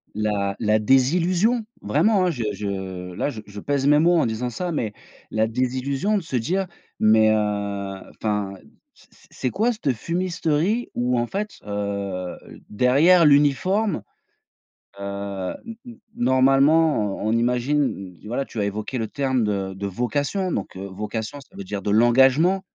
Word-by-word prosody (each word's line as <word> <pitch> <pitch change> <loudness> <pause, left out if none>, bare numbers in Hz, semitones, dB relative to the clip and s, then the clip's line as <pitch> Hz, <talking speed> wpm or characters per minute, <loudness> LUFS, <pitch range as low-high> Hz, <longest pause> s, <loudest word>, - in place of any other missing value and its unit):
la 105 -2 -1
la 110 -1 +2
désillusion 175 - +2 0.2
vraiment, 185 - +2
hein, 180 - +2
je 125 -7 -4
je 95 -3 -5
là 95 - -1
je 115 -7 -7
je 105 0 -9
pèse 140 +4 -1
mes 150 +1 +5
mots 170 +2 +4
en - - +3
disant 115 +2 -2
ça, 175 +8 -4
mais 115 -9 -2 0.4
la 110 0 +1
désillusion 130 - -1
de 195 - -3
se 160 -5 -5
dire: 175 +11 0 0.3
«Mais 110 0 +5
heu, 110 - +4 0.7
enfin 105 -2 -2 0.4
c - - -22
c - - -23
c'est 130 - -3
quoi 225 +5 +1
cette 170 - -1
fumisterie?» 175 - -1
où 125 0 +1
en 120 - -1
fait, 210 - -4
heu, 100 -3 -3 0.3
derrière 140 - +5
l'uniforme, 150 - +3 1.0
heu, 100 -1 -4
n 230 -1 -7
n 240 -1 -11 0.2
normalement, 135 -2 +3
on - - 0
on - - +1
imagine, 120 -4 0
tu - - -16
voilà 125 +5 -2
tu - - -9
as 105 - +1
évoqué 105 +5 -3
le 115 -3 -2
terme 130 -3 0
de 100 -2 -2
de 100 +1 -4
vocation 140 - -1
donc 100 - -4
heu, 95 +1 -6
vocation 105 +7 -5
ça - - -24
veut 100 - -6
dire 100 +1 -5
de 105 - -2
l'engagement 130 - +4
125 Hz, 165 wpm, -23 LUFS, 105-160 Hz, 1.0 s, mes